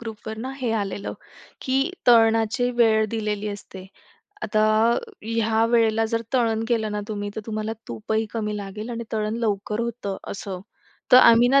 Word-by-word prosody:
ग्रुपवर 220 -1 -7
ना 255 +4 -4
हे 245 - -1
आलेलं, 200 -2 -3 0.5
की 270 +4 +1 0.2
तळणाची 225 +1 +4
वेळ 220 -2 +4
दिलेली 210 -2 -2
असते. 190 -2 -9 0.6
आता 215 0 +1 0.3
अ, - - +1 0.2
ह्या 225 0 +1
वेळेला 225 -1 +3
जर 230 0 -1
तळण 225 -3 +1
केलं 220 -3 0
ना 210 - -2
तुम्ही, 205 -1 -4
तर - - -2
तुम्हाला 215 0 -3 0.2
तूपही 220 +1 -2
कमी 210 -2 -2
लागेल 210 +3 -6
आणि 235 0 -4
तळण 215 0 -1
लवकर 210 +1 -1
होतं 235 -4 -3
असं. 190 -2 -6 0.5
तर - - +11
आम्ही 235 0 +7
ना 275 +1 +5
220 Hz, 160 wpm, -24 LUFS, 210-230 Hz, 0.6 s, तर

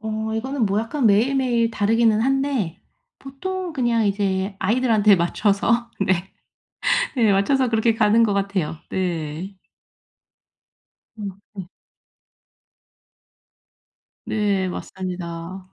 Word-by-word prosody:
어 220 0 -3
이거는 255 0 -1
뭐 200 +2 +1
약간 230 +2 -1
매일 220 +7 +3
매일 240 -3 +1
다르기는 220 +1 +2
한데 270 - 0 0.4
보통 360 +6 -5
그냥 235 -5 +1
이제 195 -1 -1
아이들한테 215 -1 +3
맞춰서 210 +7 +1
네. 190 -1 0 0.9
네 225 -4 +3
맞춰서 255 +6 +2
그렇게 225 0 +2
가는 225 +1 +4
것 205 -3 +2
같아요. 195 -5 -1
네. 175 +1 -3 1.6
음 200 -2 -4 0.2
네. 190 -3 -7 2.6
네 200 -3 0
맞습니다. 180 0 -6
210 Hz, 200 characters per minute, -22 LUFS, 190-235 Hz, 2.6 s, 가는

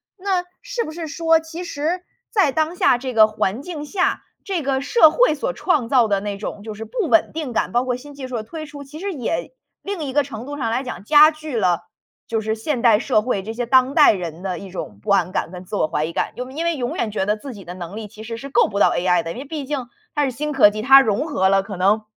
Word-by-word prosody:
那 375 -2 -1 0.2
是 - - -3
不 - - -6
是 335 0 -5
说 325 0 +2
其 325 +2 -7
实 330 +3 -2 0.3
在 385 - +3
当 315 +3 0
下 245 - +4
这 255 0 -5
个 215 -1 +7
环 215 +2 -2
境 300 -3 -6
下， 365 +4 0 0.2
这 375 -6 -2
个 270 -1 0
社 310 - +5
会 400 -6 +3
所 280 - -2
创 270 -5 0
造 250 -4 +4
的 200 -2 +1
那 205 -1 -4
种 205 0 -6
就 220 -1 -6
是 220 +2 -7
不 455 -9 -2
稳 335 - +4
定 310 -5 -4
感， 230 - -1
包 245 +1 +3
括 250 -1 -1
新 290 +3 -12
技 270 -2 -8
术 245 - -3
的 215 - -4
推 310 +8 -7
出， 290 -2 -10
其 305 +3 -10
实 400 +1 -3
也 320 - -3 0.3
另 390 -5 -4
一 265 - -5
个 290 0 +3
程 240 -3 -8
度 290 - -6
上 230 -6 -2
来 245 - 0
讲， 250 -8 -7
加 300 +6 +7
剧 310 -3 -7
了， 180 -5 +2 0.5
就 225 -1 -1
是 220 0 -1
现 245 +3 -2
代 230 -4 +6
社 220 -2 +1
会 210 -4 -2
这 220 +3 -5
些 240 +1 -3
当 260 +2 +4
代 300 -2 +7
人 175 -4 -6
的 185 -2 -3
一 190 +1 -9
种 105 - -7
不 - - -1
安 185 -2 +3
感 170 - -2
跟 180 -1 -8
自 205 - -6
我 155 - +1
怀 150 0 -1
疑 160 - -3
感。 - - -2
又 250 +1 -6
因 315 +5 -4
为 335 -2 0
永 245 -2 -3
远 215 - -1
觉 190 -2 -2
得 210 +1 +1
自 270 +3 -8
己 200 -3 -11
的 175 0 -8
能 180 +2 -7
力 220 -1 -6
其 215 +1 -12
实 230 0 -6
是 275 +3 -8
够 240 - +4
不 200 -1 -3
到 - - +6
AI 180 -1 +2
的， 165 - -5
因 - - -10
为 275 - -6
毕 295 -1 -5
竟 265 -3 -3 0.3
它 295 - +2
是 265 - -1
新 300 +5 -3
科 250 -7 +6
技， 215 - -4
它 270 +4 +8
融 235 +5 0
合 190 - +1
了 195 0 +4
可 195 -1 -8
能 205 +4 +2
255 Hz, 305 characters per minute, -21 LUFS, 210-305 Hz, 0.5 s, 它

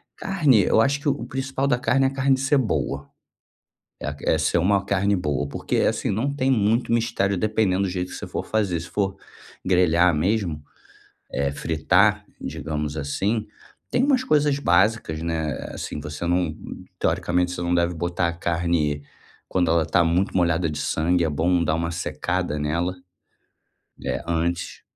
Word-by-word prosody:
Carne, 150 - +3
eu - - +3
acho 140 +5 +2
que 145 - +1
o 120 -4 -2
principal 135 +2 -2
da 125 -3 +2
carne 135 +2 +2
é - - +5
a 135 - -3
carne 135 0 +2
ser 135 +2 +2
boa. 70 - -1 0.9
É - - -3
que - - -4
é - - +4
ser - - +1
uma 100 +3 +2
carne 100 +1 +1
boa, 75 -5 -1
porque, - - -2
assim - - +1
não 125 +8 -1
tem 135 -2 0
muito 115 0 +2
mistério, 115 -4 +1
dependendo 100 -1 +1
do 95 - 0
jeito 90 0 -3
que - - -6
você - - -6
for - - -4
fazer. 100 -6 0
Se 85 - -8
for 100 -2 -1 0.5
grelhar 90 -2 +4
mesmo, 85 -2 0 0.7
eh, 70 -1 0
fritar, 90 +8 +2 0.2
digamos 75 0 -4
assim, 95 +10 -1 0.4
tem 255 - +2
umas 270 -3 +3
coisas 150 - +2
básicas, 95 - +2
né, 80 -3 -2 0.2
assim 75 - -5
você 75 +3 -6
não, 85 -2 0 0.4
teoricamente 90 0 +1
você 90 - -5
não 85 0 0
deve 85 0 +2
botar 85 +1 -1
a - - -1
carne 85 -3 0 0.5
quando 90 -2 +1
ela 80 0 +3
tá 85 +2 +2
muito 90 +4 +1
molhada 85 -2 +2
de 75 - -5
sangue, 80 +4 +1
é - - +1
bom 85 +4 +1
dar 80 - +1
uma 85 +1 -1
secada 85 0 -2
nela. 85 +5 -1 1.1
É, - - -2
antes. 85 +1 -2
90 Hz, 170 wpm, -24 LUFS, 80-110 Hz, 1.1 s, é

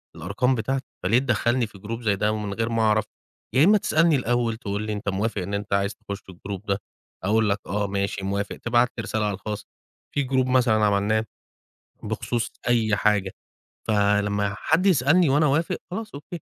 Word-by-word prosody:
الأرقام 130 +1 0
بتاعتي، 130 +3 -2 0.2
فليه 115 +6 +4
تدخّلني 120 -1 +1
في 105 - -15
جروب 110 +4 -6
زي 105 -4 +2
ده 105 +2 0
من 105 -2 -4
غير 115 +2 -1
ما 115 -1 0
أعرف؟ 110 -1 +3 0.5
يا 130 +3 +5
إما 205 +5 +6
تسألني 165 -4 +3
الأول 120 -3 0
تقول 105 -3 -3
لي 110 0 -3
أنت 105 0 -3
موافق 100 +1 -1
إن 100 +3 -5
أنت 100 0 -3
عايز 100 0 +1
تخش 105 -2 -7
الgroup 95 +1 -7
ده؟ 100 0 0 0.4
هاقول 110 +2 +2
لك 100 +1 +1
آه 100 +2 -1
ماشي 100 0 -2
موافق 100 +1 -2
تبعت 120 +1 +2
لي - - -1
رسالة 110 -1 -1
على 105 - 0
الخاص. 105 +1 -5 0.5
في 140 -2 0
group 130 -1 +2
مثلًا 120 -4 +3
عملناه. 105 +2 +2 0.8
بخصوص 120 -2 -2 0.2
أي 110 -3 +3
حاجة. 100 -3 +1 0.6
فلما 105 -1 +2
حد 165 +4 +1
يسألني 165 -1 +4
وأنا 145 +3 +4
أوافق 150 +3 +1
خلاص 215 +4 -5
أوكي. 155 +4 -8
110 Hz, 185 wpm, -24 LUFS, 100-125 Hz, 0.8 s, إما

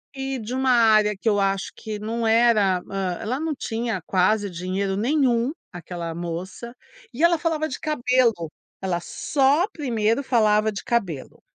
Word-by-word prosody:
e 270 -1 -3
de 230 +3 -5
uma 260 0 +2
área 215 -3 +5
que 195 - -6
eu 205 -2 +3
acho 195 0 -1
que 215 -2 -6
não 225 +2 -3
era 220 -5 +3
hã, 190 -3 -2
ela 245 +4 -2
não 315 +1 -2
tinha 230 -6 -3
quase 200 +3 +1
dinheiro 185 +3 -2
nenhum, 245 +1 +1 0.2
aquela 170 -1 -6
moça. 175 +7 -6 0.4
E 275 - -5
ela 340 0 +5
falava 315 -1 -1
de 265 - -5
cabelo, 250 - +1 0.3
ela 180 -3 -1
só 285 - +1
primeiro 235 - -1
falava 215 -4 +3
de 200 - -6
cabelo. 195 - -2
220 Hz, 155 wpm, -23 LUFS, 195-255 Hz, 0.4 s, área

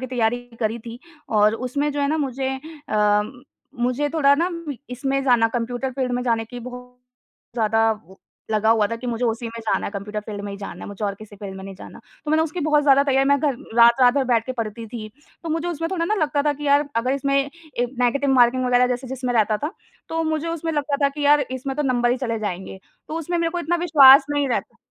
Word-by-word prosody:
की 260 - -4
तैयारी 245 -1 0 0.2
करी 220 +1 -1
थी 235 +1 -9 0.4
और 210 +1 +4
उसमें 285 +3 -1
जो 290 - -2
है 280 - +2
ना 315 - +1
मुझे 270 -2 -2 0.4
अ, 210 -1 +3 0.6
मुझे 280 +4 0
थोड़ा 280 -3 +5
ना 340 +5 +1 0.4
इसमें 270 +2 -1
जाना 240 -3 +4
कंप्यूटर 245 +2 -3
फ़ील्ड 255 -1 -2
में 245 0 -1
जाने 230 -2 0
की 245 +2 -9
बहुत 250 0 -10 0.6
ज़्यादा 225 0 +2 0.6
लगा 220 0 +2
हुआ 220 -2 +4
था 230 - -2
कि 245 +2 -8
मुझे 240 +1 -2
उसी 230 +1 -1
में 230 0 -7
जाना 220 - -1
है, - - -4
कंप्यूटर 210 +1 -5
फ़ील्ड 205 -2 -5
में 200 - -5
ही 200 - -6
जाना 200 - -8
है। - - -8
मुझे 205 +1 -5
और 200 -1 -1
किसी 205 0 -13
फ़ील्ड 195 -1 -8
में 190 - -9
नहीं 195 -1 -8
जाना। - - -12 0.3
तो 300 - -3
मैंने 315 +1 +3
उसकी 330 +2 -4
बहुत 300 -1 +4
ज़्यादा 280 -1 +5
तैयारी 270 0 +2
मैं 280 0 +4
घर 280 -4 0 0.2
रात 235 +2 +6
रात 245 +1 +6
भर 275 -2 +2
बैठ 230 -1 +2
के 255 - -2
पढ़ती 225 +1 -5
थी। 215 -1 -7 0.3
तो 330 - -5
मुझे 325 +2 -1
उसमें 330 -1 -3
थोड़ा 355 -3 -1
ना 425 +5 +1
लगता 295 -6 0
था 295 0 +2
कि 295 +1 -8
यार 285 +1 +3
अगर 245 +3 +1
इसमें 275 0 0
ए 280 -3 -2
नेगेटिव 275 +3 +2
मार्किंग 255 0 +4
वगैरह 250 0 +4
जैसे 250 +1 -3
जिसमें 255 -1 -3
रहता 215 -1 +3
था, 300 - -4 0.4
तो 325 0 -1
मुझे 315 +1 -2
उसमें 330 0 -3
लगता 290 -1 -1
था 280 - +5
कि 290 +1 -6
यार 295 0 +6
इसमें 265 +1 -4
तो 295 - 0
नंबर 245 -3 +1
ही 250 - +1
चले 230 -4 -2
जाएँगे। 190 -2 -5 0.3
तो 320 - -3
उसमें 345 +2 -2
मेरे 330 0 0
को 350 - -3
इतना 345 +1 0
विश्वास 275 -3 +8
नहीं 290 -1 0
रहता। - - -3
255 Hz, 240 wpm, -22 LUFS, 230-290 Hz, 0.6 s, विश्वास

